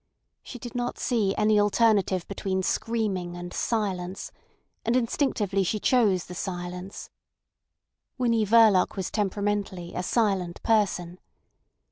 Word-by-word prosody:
She 250 - -9
did 240 -1 -8
not 245 0 -3
see 215 -6 0
any 210 0 +3
alternative 205 -3 +2
between 190 -1 -2
screaming 190 -6 -1
and 175 0 -7
silence, 190 -5 -2 0.5
and 230 +2 +1
instinctively 225 -6 0
she 210 +4 -1
chose 205 -7 +2
the 180 - -9
silence. 180 +1 -6 1.1
Winnie 230 -3 +2
Verloc 215 -3 +5
was 190 -3 -3
temperamentally 205 -3 -2
a - - -2
silent 190 -4 0
person. 190 -5 +1
200 Hz, 115 wpm, -26 LUFS, 185-225 Hz, 1.1 s, Verloc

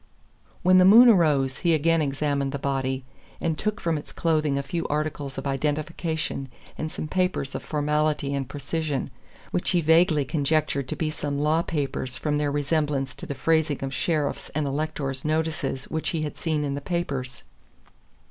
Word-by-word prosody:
When 185 0 +6
the - - +7
moon 230 +6 +9
arose 150 - +3
he 170 -3 +3
again 165 +2 +2
examined 140 -1 0
the - - -1
body, 135 -1 -2 0.3
and 165 -2 0
took 210 +6 -2
from 165 -3 0
its - - -10
clothing 155 -4 +1
a 140 - -1
few 165 +5 -3
articles 145 -2 -3
of 135 - -5
identification 150 +1 -2 0.3
and 155 0 -4
some - - -5
papers 180 -6 -1
of - - -4
formality 150 -1 0
and 135 -2 -2
precision, 145 -1 -3 0.4
which 180 - 0
he 175 -2 +3
vaguely 160 -2 +4
conjectured 145 -2 0
to - - -3
be 155 -1 -1
some 145 -2 -3
law 155 +3 +2
papers 135 -5 -2
from 150 -1 0
their 145 -1 0
resemblance 145 -2 0
to - - -9
the 140 - -4
phrasing 155 0 +1
of 135 0 -3
sheriffs' 150 -1 -1
and 155 -1 0
electors' 140 -2 -2
notices 155 -3 -1
which 160 0 -1
he 160 -2 -1
had 150 - -4
seen 155 -3 0
in 140 -1 -1
the 140 - -4
papers. 140 -7 -3
150 Hz, 175 wpm, -25 LUFS, 140-160 Hz, 0.4 s, moon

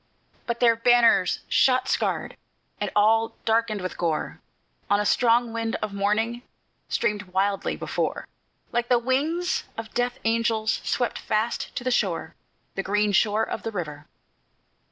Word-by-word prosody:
But 235 -1 -2
their 230 -1 +5
banners, 235 -5 +4
shot 255 -1 +3
scarred, - - -1 0.4
and - - -1
all 225 +2 +3
darkened 225 -2 +1
with 185 - -5
gore, 160 -3 -2 0.5
On 205 - +3
a 210 - 0
strong 235 +1 +3
wind 230 0 -2
of 215 -2 -4
morning 215 +4 0 0.5
streamed 210 -3 0
wildly 195 +1 -1
before, - - -3 0.4
Like 240 0 -1
the 245 - +5
wings 290 +9 0
of 225 -1 -7
death 245 0 -1
angels 225 -1 +1
swept 245 - -1
fast 215 +2 -2
to - - -3
the 255 - 0
shore, 190 -8 0 0.4
The 195 - -2
green 205 +2 +1
shore 210 +2 +3
of - - -4
the 225 - -4
river. 150 -7 -6
225 Hz, 145 wpm, -25 LUFS, 205-235 Hz, 0.5 s, their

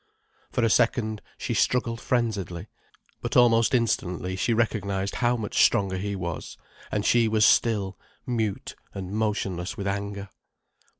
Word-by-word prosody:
For 120 - 0
a 115 - +4
second, 110 -2 +1 0.2
she - - -3
struggled 115 -2 +1
frenziedly. 100 -8 -1 0.6
But - - -1
almost 115 0 +5
instantly 95 -6 -1
she 105 +6 0
recognized 100 -4 0
how 120 0 +2
much 110 -3 +1
stronger 95 -2 +2
he 100 +2 -3
was, 85 -4 -5 0.3
and 105 -1 -1
she 120 -1 +4
was 110 -1 +3
still, 100 -5 +2 0.3
mute 110 -6 -2 0.2
and 95 -1 -5
motionless 105 -2 -2
with 100 - -4
anger. 100 0 -3
105 Hz, 135 wpm, -26 LUFS, 95-115 Hz, 0.6 s, almost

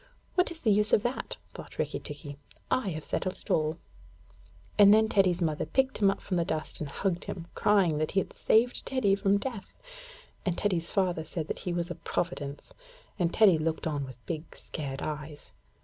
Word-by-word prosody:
'What 360 - +3
is 335 -1 -8
the 220 - +3
use 210 +1 +3
of 210 - +5
that?' 245 +2 -2 0.2
thought - - -10
Rikki - - -1
tikki. 145 -1 -7 0.3
'I 255 -5 +2
have 155 -3 -4
settled 185 - -2
it - - -8
all'; 155 0 +2 1.0
and 200 -1 +9
then 220 +1 +6
Teddy's 185 -4 +3
mother 155 -2 0
picked 265 0 +1
him 200 -2 +5
up 195 - -1
from 185 - -2
the 170 - +2
dust 160 -1 -2
and 150 - -4
hugged 180 +3 -2
him, 170 -3 -5
crying 190 -7 +3
that 155 - -1
he 195 - +4
had - - -4
saved 240 +3 +2
Teddy 245 -7 +2
from 200 0 +3
death, 225 -2 -6 0.7
and 180 -3 -1
Teddy's 175 -5 0
father 180 -5 +1
said 160 0 -4
that - - -3
he 180 - -3
was 175 0 -1
a - - -1
providence, 145 -4 -4 0.5
and 175 -2 +2
Teddy 195 -7 +5
looked 160 0 -1
on 145 -3 -1
with 130 -2 -10
big 160 -1 -5
scared 140 -3 -6
eyes. 150 -1 -6
175 Hz, 195 wpm, -29 LUFS, 155-205 Hz, 1.0 s, and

